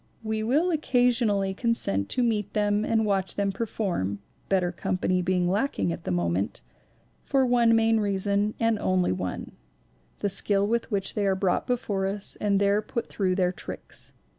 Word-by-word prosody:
We 220 Hz, 0 st, -2 dB
will 295 Hz, +11 st, +2 dB
occasionally 245 Hz, -, +1 dB
consent 190 Hz, -, 0 dB
to 250 Hz, -, +1 dB
meet 210 Hz, -4 st, -1 dB
them 205 Hz, 0 st, +1 dB
and 220 Hz, 0 st, +1 dB
watch 195 Hz, -2 st, -1 dB
them 200 Hz, -1 st, 0 dB
perform 190 Hz, -, -2 dB, 0.3 s
(better 185 Hz, -2 st, +2 dB
company 185 Hz, +1 st, -1 dB
being 180 Hz, 0 st, +1 dB
lacking 200 Hz, -2 st, 0 dB
at 165 Hz, -, -9 dB
the -, -, -2 dB
moment) 90 Hz, -2 st, -1 dB, 0.6 s
for 270 Hz, -1 st, +2 dB
one 240 Hz, -2 st, +4 dB
main 225 Hz, 0 st, +3 dB
reason 200 Hz, +1 st, 0 dB
and 225 Hz, -2 st, +1 dB
only 185 Hz, -, +1 dB
one: 90 Hz, -1 st, -4 dB, 0.7 s
the -, -, -1 dB
skill 200 Hz, +1 st, +3 dB
with 230 Hz, +2 st, -1 dB
which 200 Hz, -3 st, -2 dB
they 205 Hz, -1 st, 0 dB
are 190 Hz, -, +2 dB
brought 190 Hz, -1 st, 0 dB
before 205 Hz, -6 st, -1 dB
us 200 Hz, +1 st, -1 dB
and 200 Hz, -2 st, +1 dB
there 200 Hz, +1 st, +2 dB
put 235 Hz, +2 st, -4 dB
through 185 Hz, -3 st, -1 dB
their 180 Hz, -1 st, +2 dB
tricks. -, -, -9 dB
200 Hz, 165 wpm, -26 LUFS, 185-225 Hz, 0.7 s, one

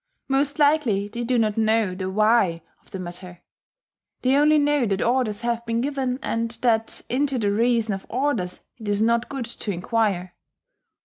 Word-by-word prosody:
Most 280 Hz, +1 st, +1 dB
likely 285 Hz, -10 st, +2 dB
they 235 Hz, +3 st, -5 dB
do 245 Hz, +1 st, +1 dB
not 215 Hz, -2 st, +1 dB
know 220 Hz, -3 st, +2 dB
the 185 Hz, 0 st, -4 dB
"why" 205 Hz, -5 st, +2 dB, 0.2 s
of -, -, -24 dB
the -, -, -6 dB
matter: 180 Hz, 0 st, -8 dB, 0.8 s
they 260 Hz, +1 st, +3 dB
only 300 Hz, +2 st, +5 dB
know 290 Hz, -4 st, +2 dB
that 195 Hz, -1 st, 0 dB
orders 235 Hz, -3 st, 0 dB
have 235 Hz, -1 st, -1 dB
been 230 Hz, 0 st, 0 dB
given, 260 Hz, -1 st, -1 dB
and 230 Hz, 0 st, -1 dB
that 225 Hz, -2 st, +1 dB
into 270 Hz, +1 st, 0 dB
the 205 Hz, -4 st, +1 dB
reason 230 Hz, 0 st, +1 dB
of 195 Hz, -, -7 dB
orders 240 Hz, -9 st, -1 dB, 0.2 s
it 215 Hz, -2 st, -5 dB
is 205 Hz, +1 st, +1 dB
not 235 Hz, +1 st, +1 dB
good 270 Hz, -3 st, -4 dB
to 225 Hz, -2 st, -4 dB
enquire. 185 Hz, -1 st, -1 dB
230 Hz, 175 wpm, -23 LUFS, 205-255 Hz, 0.8 s, only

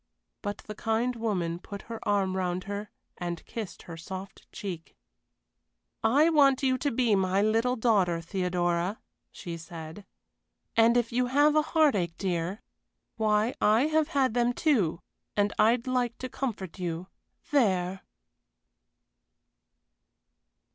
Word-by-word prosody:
But 205 Hz, -1 st, -5 dB
the 210 Hz, -, -6 dB
kind 225 Hz, +3 st, 0 dB
woman 180 Hz, -7 st, -1 dB
put 200 Hz, +2 st, -9 dB
her 230 Hz, -1 st, -7 dB
arm 195 Hz, -2 st, +1 dB
round 180 Hz, -1 st, -1 dB
her 205 Hz, +1 st, -5 dB, 0.3 s
and 175 Hz, -2 st, -4 dB
kissed 220 Hz, -5 st, -7 dB
her 165 Hz, -2 st, -9 dB
soft 190 Hz, +3 st, -9 dB
cheek. 175 Hz, -5 st, -7 dB, 1.1 s
"I 285 Hz, +8 st, +5 dB
want 275 Hz, -4 st, +4 dB
you 260 Hz, -1 st, +2 dB
to 285 Hz, -, 0 dB
be 235 Hz, -3 st, +2 dB
my 190 Hz, 0 st, +2 dB
little 225 Hz, +4 st, +2 dB
daughter, 200 Hz, -8 st, +2 dB
Theodora," 175 Hz, +2 st, -1 dB, 0.3 s
she 170 Hz, -3 st, -7 dB
said. 165 Hz, +3 st, -9 dB, 0.7 s
"And 230 Hz, +1 st, +5 dB
if 240 Hz, -1 st, +1 dB
you 250 Hz, +1 st, +1 dB
have 290 Hz, +4 st, +4 dB
a 305 Hz, -, +6 dB
heartache, 275 Hz, -, +2 dB
dear, 185 Hz, +4 st, -2 dB, 0.5 s
why 215 Hz, +2 st, +2 dB
I 215 Hz, +3 st, +5 dB
have 315 Hz, -1 st, +2 dB
had 265 Hz, -5 st, +1 dB
them, 245 Hz, 0 st, +2 dB
too 215 Hz, -, +1 dB, 0.4 s
and 205 Hz, 0 st, +2 dB
I'd 235 Hz, +2 st, +4 dB
like 250 Hz, -2 st, 0 dB
to 255 Hz, -, -5 dB
comfort 205 Hz, -11 st, -4 dB
you. 175 Hz, -1 st, -3 dB, 0.5 s
There!" 190 Hz, -8 st, +2 dB
210 Hz, 130 wpm, -28 LUFS, 180-245 Hz, 1.1 s, a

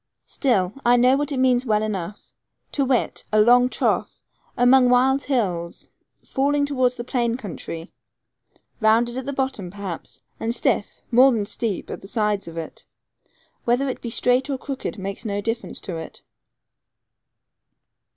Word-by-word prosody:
Still 205 Hz, -, 0 dB
I 240 Hz, +1 st, +5 dB
know 250 Hz, +2 st, +5 dB
what 290 Hz, +1 st, -1 dB
it 275 Hz, -, -2 dB
means 255 Hz, -1 st, +3 dB
well 215 Hz, -4 st, +1 dB
enough 200 Hz, -2 st, -5 dB, 0.4 s
to 280 Hz, -, 0 dB
wit, 255 Hz, -2 st, 0 dB
a 215 Hz, -, +4 dB
long 245 Hz, +3 st, +6 dB
trough -, -, -1 dB, 0.3 s
among 250 Hz, +1 st, +5 dB
wild 265 Hz, +2 st, +3 dB
hills, 180 Hz, -11 st, -2 dB, 0.4 s
falling 285 Hz, +2 st, +1 dB
towards 255 Hz, -3 st, +1 dB
the 240 Hz, -, -5 dB
plain 240 Hz, -2 st, -1 dB
country, 170 Hz, -7 st, -7 dB, 0.9 s
rounded 230 Hz, +2 st, +3 dB
at 260 Hz, 0 st, -4 dB
the -, -, -1 dB
bottom, 265 Hz, -9 st, -2 dB
perhaps, 195 Hz, -3 st, -8 dB, 0.2 s
and 230 Hz, +1 st, -1 dB
stiff, 205 Hz, -, -1 dB
more 255 Hz, +3 st, +7 dB
than 220 Hz, -4 st, 0 dB
steep, 210 Hz, -1 st, -3 dB
at -, -, -6 dB
the 195 Hz, -, -11 dB
sides 210 Hz, -3 st, -1 dB
of 165 Hz, 0 st, -9 dB
it. 165 Hz, -1 st, -7 dB, 0.8 s
Whether 245 Hz, +4 st, +2 dB
it 255 Hz, -, -5 dB
be 235 Hz, -, -5 dB
straight 250 Hz, +4 st, +1 dB
or 275 Hz, -, -1 dB
crooked, 270 Hz, -3 st, -5 dB
makes 195 Hz, +2 st, -5 dB
no 205 Hz, -3 st, -2 dB
difference 225 Hz, +3 st, -2 dB
to 180 Hz, -5 st, -5 dB
it. 160 Hz, -, -9 dB
240 Hz, 155 wpm, -23 LUFS, 205-260 Hz, 0.9 s, more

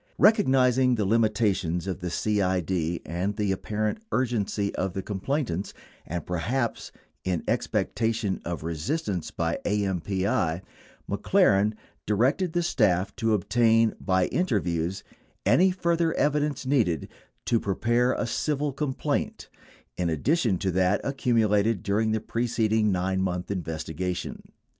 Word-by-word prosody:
Recognizing 130 Hz, -, +4 dB
the 105 Hz, -3 st, 0 dB
limi 110 Hz, +2 st, +3 dB
tations 95 Hz, -6 st, 0 dB
of 95 Hz, -1 st, -3 dB
the 90 Hz, -1 st, -3 dB
CID 90 Hz, -3 st, 0 dB
and 90 Hz, +4 st, -2 dB
the 105 Hz, -2 st, 0 dB
apparent 105 Hz, -, -2 dB
urgency 110 Hz, -5 st, 0 dB
of 95 Hz, -1 st, -2 dB
the 95 Hz, -, -4 dB
complainants 105 Hz, -, -2 dB
— -, -, -29 dB
and 85 Hz, +2 st, -4 dB
perhaps 115 Hz, +8 st, -2 dB, 0.3 s
in 90 Hz, -3 st, -1 dB
expectation 110 Hz, -4 st, -1 dB
of 85 Hz, -2 st, -4 dB
resistance 85 Hz, -, -2 dB
by 85 Hz, 0 st, -2 dB
AMPI 95 Hz, -3 st, 0 dB, 0.2 s
— -, -, -28 dB
McLaren 105 Hz, +2 st, +3 dB, 0.3 s
di 105 Hz, -, +2 dB
rected 155 Hz, -, +1 dB
the 175 Hz, 0 st, +1 dB
staff 100 Hz, -, +1 dB
to 110 Hz, -1 st, +2 dB
obtain 115 Hz, +2 st, +3 dB
by 95 Hz, -2 st, +2 dB
interviews 95 Hz, -, -1 dB, 0.4 s
any 190 Hz, +2 st, +5 dB
further 170 Hz, -2 st, +1 dB
evidence 145 Hz, -2 st, 0 dB
needed 115 Hz, -, +1 dB, 0.4 s
to 115 Hz, -, +2 dB
prepare 120 Hz, +6 st, +1 dB
a -, -, -1 dB
civil 145 Hz, +4 st, -1 dB
complaint, 140 Hz, -1 st, -2 dB, 0.5 s
in 90 Hz, -1 st, 0 dB
addition 115 Hz, -, +1 dB
to 95 Hz, 0 st, -1 dB
that 95 Hz, +2 st, +2 dB
accumulated 115 Hz, -6 st, +1 dB
during 110 Hz, +2 st, +1 dB
the 110 Hz, -, +1 dB
preceding 110 Hz, -2 st, +1 dB
9 95 Hz, +1 st, 0 dB
month 90 Hz, 0 st, -2 dB
investigation. 85 Hz, 0 st, -4 dB
105 Hz, 130 wpm, -26 LUFS, 90-120 Hz, 0.5 s, any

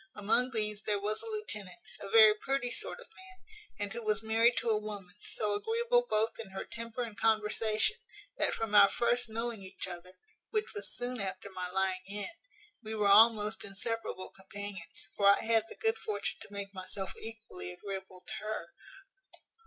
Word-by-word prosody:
Among 220 Hz, +5 st, +3 dB
these 210 Hz, -3 st, -1 dB
there 210 Hz, -1 st, 0 dB
was 210 Hz, +2 st, -1 dB
a -, -, -6 dB
lieutenant, 425 Hz, -, -4 dB, 0.2 s
a 200 Hz, -, -6 dB
very 220 Hz, 0 st, +9 dB
pretty 245 Hz, +3 st, -1 dB
sort -, -, -2 dB
of -, -, -11 dB
man, 375 Hz, 0 st, -15 dB, 0.3 s
and 205 Hz, 0 st, -3 dB
who 235 Hz, -, -4 dB
was 215 Hz, 0 st, +2 dB
married 225 Hz, +2 st, +4 dB
to 230 Hz, -, 0 dB
a 215 Hz, -, +3 dB
woman, 205 Hz, -4 st, -7 dB, 0.2 s
so 210 Hz, -1 st, +1 dB
agreeable 470 Hz, -, +2 dB
both 220 Hz, +2 st, +1 dB
in 220 Hz, -4 st, -6 dB
her 190 Hz, 0 st, -5 dB
temper 230 Hz, +1 st, -4 dB
and 225 Hz, -3 st, -7 dB
conversation, 220 Hz, -, +2 dB, 0.4 s
that -, -, +1 dB
from 225 Hz, -2 st, -3 dB
our 200 Hz, -1 st, +9 dB
first 240 Hz, +3 st, +1 dB
knowing 230 Hz, -1 st, -2 dB
each 190 Hz, 0 st, -5 dB
other, 180 Hz, 0 st, -8 dB, 0.4 s
which 430 Hz, -1 st, -1 dB
was 410 Hz, -, -5 dB
soon 245 Hz, -1 st, -3 dB
after 190 Hz, 0 st, -4 dB
my 180 Hz, -1 st, -4 dB
lying 190 Hz, 0 st, +1 dB
in, 205 Hz, +1 st, -3 dB, 0.5 s
we 220 Hz, -1 st, -5 dB
were 210 Hz, -2 st, +2 dB
almost 215 Hz, +1 st, +6 dB
inseparable 200 Hz, -1 st, -4 dB
companions; 195 Hz, 0 st, -7 dB
for 200 Hz, -, +4 dB
I 200 Hz, -, +7 dB
had 225 Hz, -1 st, +3 dB
the -, -, -7 dB
good 450 Hz, 0 st, +2 dB
fortune 205 Hz, -2 st, -3 dB
to -, -, -9 dB
make 200 Hz, 0 st, -6 dB
myself 190 Hz, +1 st, -4 dB
equally 220 Hz, -, -6 dB
agreeable 190 Hz, -, -7 dB
to -, -, -5 dB
her. 215 Hz, -6 st, -4 dB
215 Hz, 180 wpm, -32 LUFS, 200-230 Hz, 0.5 s, very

